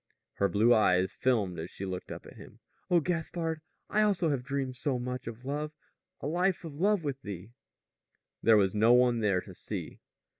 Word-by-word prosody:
Her 100 - +2
blue 110 +4 +5
eyes 95 -4 +3
filmed 105 -9 0
as 80 +2 -5
she 100 - -6
looked 95 -1 -5
up - - -7
at - - -12
him. - - -13 0.3
"Oh, 175 -2 +4
Gaspard, 165 -1 -2 0.3
I 215 - +2
also 190 -6 +2
have 135 -3 0
dreamed 135 -1 -2
so 130 +1 -1
much 125 0 -4
of 115 +2 -7
love 150 +2 -3 0.5
a - - -5
life 175 +4 +1
of 150 -2 -8
love 200 -1 +3
with 140 -2 -3
thee!" 100 +1 -7 0.9
There 115 -1 +6
was 95 -2 +3
no 110 +3 +5
one 125 -1 +4
there 100 -4 +2
to - - -11
see. - - -6
125 Hz, 190 wpm, -30 LUFS, 105-155 Hz, 0.9 s, There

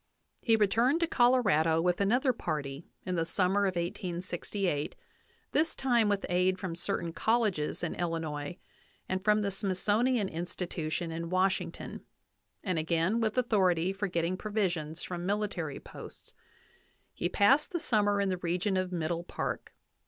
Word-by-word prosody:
VIII 230 - +2
He - - +8
returned 230 - +3
to - - +4
Colorado 230 - +3
with 175 +2 +1
another 245 +6 +3
party 150 - -4 0.2
in 185 - -2
the 165 -2 +1
summer 195 +4 +2
of 185 - -2
1868, 175 -1 -2 0.6
this 315 +2 +1
time 240 -5 +2
with 200 -1 0
aid 180 +1 +2
from 185 -2 -4
certain 170 -1 -2
colleges 215 -11 0
in 170 - -1
Illinois, 165 -2 -3 0.5
and 185 0 -2
from 210 0 +3
the 200 - 0
Smithsonian 205 +4 +1
Institution 170 -1 -3
in 165 +1 -4
Washington, 185 +1 -1 0.6
and 185 -5 0
again 170 +7 +1
with 220 +1 0
authority 190 -7 +2
for 200 +1 -2
getting 175 0 -1
provisions 180 -7 -2
from 175 -1 -4
military 195 -6 -2
posts. - - -11 0.8
He 175 - -1
passed 270 +12 +4
the 345 - -1
summer 205 -8 +2
in 200 -1 +1
the 185 - 0
region 180 +3 0
of 185 0 -1
Middle 170 0 -2
Park. - - -4
185 Hz, 145 wpm, -30 LUFS, 170-210 Hz, 0.8 s, He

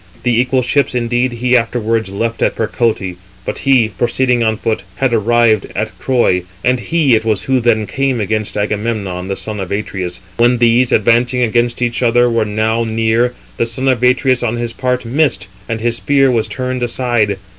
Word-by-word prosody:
The 120 -1 +2
equal 130 0 0
ships 135 +1 +1
indeed 120 +1 0
he 125 +1 +1
afterwards 115 -2 0
left 115 +4 -3
at - - +1
Percote, 110 -5 -1 0.3
but - - -3
he, 130 -5 +3
proceeding 120 +4 0
on 110 -1 +1
foot, 110 0 -2
had 135 -3 0
arrived 115 -1 +2
at 110 0 -2
Troy; 120 -8 +1 0.2
and 125 0 +2
he 160 -4 +1
it 110 -1 +3
was 110 -3 -1
who 130 -1 +1
then 115 -3 +1
came 135 +4 -1
against 110 0 -2
Agamemnon, 105 -3 -2
the 95 - -2
son 105 0 -5
of 95 -2 -5
Atreus. 95 -3 -4 0.2
When 120 +1 +3
these, 120 +1 +3
advancing 120 +3 +2
against 120 +1 0
each 120 0 -1
other, 120 0 +3
were 115 -1 +1
now 110 +2 0
near, 115 +2 0 0.2
the 115 - 0
son 130 +4 -3
of 130 -3 +2
Atreus 125 0 +2
on 120 -1 -1
his 120 -1 -4
part 125 -1 -2
missed, 120 -5 0 0.2
and 115 -1 -2
his 120 +1 -1
spear 135 -1 +2
was 115 -3 0
turned 130 -1 -4
aside. 120 -4 0
115 Hz, 185 wpm, -15 LUFS, 110-125 Hz, 0.3 s, he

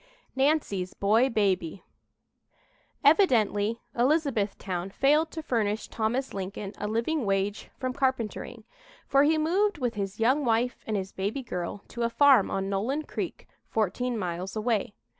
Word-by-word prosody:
"NANCY'S 265 -10 +1
BOY 220 +6 +3
BABY" 195 -6 0 1.2
Evidently 230 - +3
Elizabethtown 225 - 0
failed 300 +9 +3
to 320 -1 -6
furnish 220 -5 -1
Thomas 240 +4 -1
Lincoln 195 +1 -5
a 210 - -2
living 235 +7 0
wage 200 0 -1
from 255 -1 -2
carpentering, 260 -5 -2 0.4
for 275 - +4
he 310 +2 +4
moved 370 +6 +1
with 245 -4 -1
his 200 -1 -4
young 260 +6 +3
wife 240 +1 0
and 215 -2 0
his 190 0 -4
baby 205 +8 -3
girl 180 -2 -5
to 235 - -6
a 235 - +2
farm 270 -4 +5
on 195 0 -2
Nolen 225 +10 -1
Creek, - - -5 0.2
fourteen 230 +3 -1
miles 180 0 -4
away. 215 -2 -1
225 Hz, 140 wpm, -27 LUFS, 200-270 Hz, 1.2 s, farm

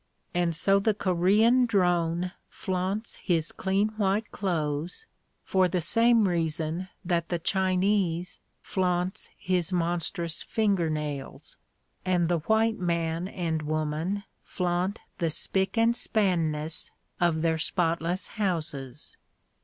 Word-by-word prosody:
And 175 -2 +1
so 195 +4 +3
the 210 +1 +1
Korean 210 +7 +3
drone 175 -4 +1 0.2
flaunts 190 +3 -3
his 165 -4 0
clean 195 +2 0
white 205 +1 0
clothes, 165 - -2 0.4
for 190 -1 +3
the 180 +1 0
same 230 +4 +4
reason 165 +1 -1 0.2
that 170 -2 0
the 175 - 0
Chinese 185 -1 +1 0.2
flaunts 180 +1 -1
his 180 -1 -1
monstrous 170 -1 -1
finger 200 -7 +1
nails, 150 -3 -5 0.5
and 180 -2 +1
the 175 -1 +2
white 220 +6 +2
man 170 -1 -1
and 165 -5 -2
woman 155 +6 -2 0.2
flaunt 180 +2 -2 0.2
the 165 - +1
spick 190 +7 +1
and 230 +1 +4
spanness 165 -9 0 0.3
of 165 -2 +2
their 160 -1 +1
spotless 170 +2 0 0.2
houses. 150 -8 -3
180 Hz, 115 wpm, -27 LUFS, 165-195 Hz, 0.5 s, same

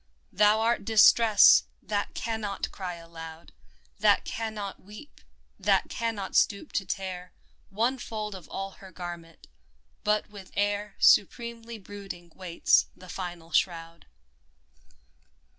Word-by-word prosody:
Thou 210 +2 +4
art 230 -1 +1
Distress 220 0 +6
— - - -35
^that 205 -1 -1
cannot 220 -4 -3
cry 180 -3 -5
alou<^ 165 -1 -11 0.5
That - - +4
cannot 215 -3 -5
weep, 210 +10 -13 0.4
that - - +2
cannot 225 -5 -3
stoop 200 +9 +2
to 195 - -2
tear 185 -2 -5 0.4
One 235 +6 0
fold 215 -3 -5
of 185 -4 -10
all 195 0 -5
her 190 -1 -12
garment, 170 -2 -9 0.6
but 210 0 +1
with 200 -3 -11
air 205 0 -1
Supremely 235 +2 +2
brooding 195 -4 -10
waits 180 -3 +2
the 185 - -14
final 175 -3 -7
shroud 165 - -1
200 Hz, 120 wpm, -28 LUFS, 180-215 Hz, 0.6 s, Distress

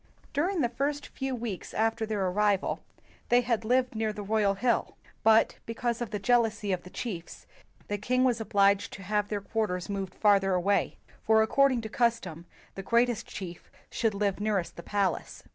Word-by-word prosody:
During 345 +5 +1
the 240 - +2
first 285 +4 -2
few 265 -1 -3
weeks 230 -6 -5
after 225 +1 0
their 210 -3 -1
arrival, 200 +1 +1 0.5
they 245 +1 +5
had 235 -2 0
lived 250 +3 +2
nearer 220 -1 -1
the 210 -1 -7
royal 205 -1 +1
hill; 235 +3 0 0.2
but, 220 0 +4
because 235 +1 -2
of 240 - -2
the 210 - -3
jealousy 220 -1 +1
of 185 - -1
the 180 - -12
chiefs, 180 -6 -6 0.4
the 205 0 -2
king 255 +5 +1
was 245 -3 +2
obliged 200 -2 +2
to 195 - -9
have 210 +1 0
their 205 -1 -3
quarters 200 -3 -2
moved 195 -2 -4
farther 195 -3 +3
away, 195 +3 +1 0.3
for 220 0 +5
according 260 +2 +3
to 220 - -6
custom 190 -9 -1 0.3
the 195 - -6
greatest 235 +2 +1
chief 175 -3 -8 0.2
should 220 -3 0
live 200 -1 0
nearest 205 -4 -1
the - - -8
palace. 200 +1 -2
215 Hz, 180 wpm, -29 LUFS, 200-235 Hz, 0.5 s, they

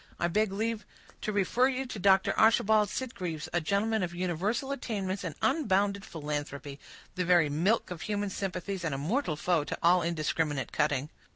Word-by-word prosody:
I 170 - +2
beg 210 +4 +1
leave 220 +2 -2 0.4
to 215 - -2
refer 210 +5 +2
you 265 0 -2
to 245 -5 -6
Dr. 195 0 +4
Archibald 215 -1 +4
Sitgreaves, 185 -11 -4
a 175 - +2
gentleman 205 +6 +1
of 175 -1 -3
universal 185 - -1
attainments 200 -8 -3
and 165 -5 -4
unbounded 200 -8 +1
philanthropy; 145 -2 -5 0.3
the 185 - -1
very 175 -3 +4
milk 180 +9 +1
of 170 -2 -6
human 205 -1 -2
sympathies, 190 -1 -4
and 155 -4 -1
a - - -3
mortal 170 - -1
foe 165 0 +1
to - - -4
all 175 +2 +5
indiscriminate 155 -4 -1
cutting." 145 -1 0
185 Hz, 170 wpm, -30 LUFS, 165-215 Hz, 0.4 s, all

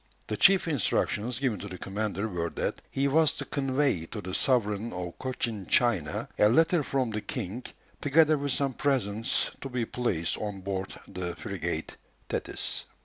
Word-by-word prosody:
The - - -3
chief 195 -2 +5
instructions 120 - +1
given 125 -6 0
to 100 - -6
the 90 -2 -7
commander 100 +2 -2
were 85 -4 -2
that - - -2
he 135 +1 +1
was 155 +2 +4
to - - -5
convey 135 - 0
to 110 - -6
the 95 -2 -6
sovereign 110 -3 +2
of 90 -1 -6
Cochin 120 -6 -2
China 100 -12 +2
a 105 - +6
letter 165 +7 +4
from 130 -4 0
the 105 0 -2
king, 105 +3 -4 0.4
together 155 +2 +5
with 140 -1 -1
some 135 0 +1
presents, 115 -6 +1
to 135 - -5
be 125 -2 -1
placed 95 -10 -1
on 105 -2 -4
board 95 0 -3 0.2
the 90 -1 -4
frigate 85 -6 -3 0.3
Thetis. - - -2
M. - - -32
110 Hz, 170 wpm, -28 LUFS, 95-135 Hz, 0.4 s, a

